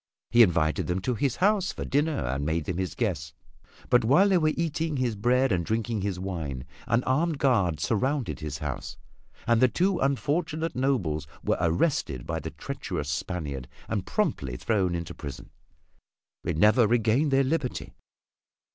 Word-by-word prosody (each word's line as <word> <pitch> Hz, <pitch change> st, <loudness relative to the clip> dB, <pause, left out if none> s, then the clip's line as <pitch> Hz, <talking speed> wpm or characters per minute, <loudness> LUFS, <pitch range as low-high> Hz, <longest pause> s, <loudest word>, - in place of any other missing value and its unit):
He 120 Hz, -, +6 dB
invited 85 Hz, -7 st, +3 dB
them 90 Hz, +1 st, 0 dB
to 125 Hz, -, 0 dB
his 125 Hz, +2 st, 0 dB
house 195 Hz, 0 st, +2 dB
to -, -, -4 dB
dinner 150 Hz, +2 st, 0 dB
and 65 Hz, +3 st, -2 dB
made 80 Hz, +1 st, -1 dB
them 90 Hz, -, -3 dB
his 95 Hz, -1 st, -3 dB
guests 80 Hz, -, -2 dB, 0.6 s
but 125 Hz, -1 st, +5 dB
while 150 Hz, -, +5 dB
they 190 Hz, -2 st, +4 dB
were 155 Hz, -1 st, +2 dB
eating 160 Hz, -2 st, -1 dB
his 125 Hz, -4 st, 0 dB
bread 125 Hz, +5 st, +2 dB
and 90 Hz, -2 st, +1 dB
drinking 110 Hz, +2 st, -1 dB
his 95 Hz, -2 st, -2 dB
wine, 80 Hz, -9 st, -4 dB, 0.2 s
an 115 Hz, +2 st, +2 dB
armed 155 Hz, +4 st, +1 dB
guard 100 Hz, -, +2 dB
surrounded 130 Hz, -, 0 dB
his 75 Hz, -2 st, -4 dB
house 75 Hz, -5 st, -5 dB, 0.5 s
and 115 Hz, 0 st, +3 dB
the 130 Hz, -, +7 dB
two 180 Hz, -, +1 dB
unfortunate 155 Hz, +4 st, 0 dB
nobles 95 Hz, -, 0 dB, 0.2 s
were -, -, +1 dB
arrested 85 Hz, -, 0 dB
by -, -, -2 dB
the -, -, -5 dB
treacherous 70 Hz, -, -5 dB
Spaniard 75 Hz, -5 st, -4 dB, 0.2 s
and -, -, -1 dB
promptly 60 Hz, -3 st, -1 dB
thrown 95 Hz, -6 st, 0 dB
into 85 Hz, 0 st, -4 dB
prison. 70 Hz, -4 st, -8 dB, 0.9 s
They -, -, -1 dB
never 105 Hz, +7 st, +5 dB
regained 120 Hz, +6 st, +2 dB
their 135 Hz, 0 st, +4 dB
liberty. 140 Hz, -2 st, -2 dB
115 Hz, 165 wpm, -27 LUFS, 85-140 Hz, 0.9 s, the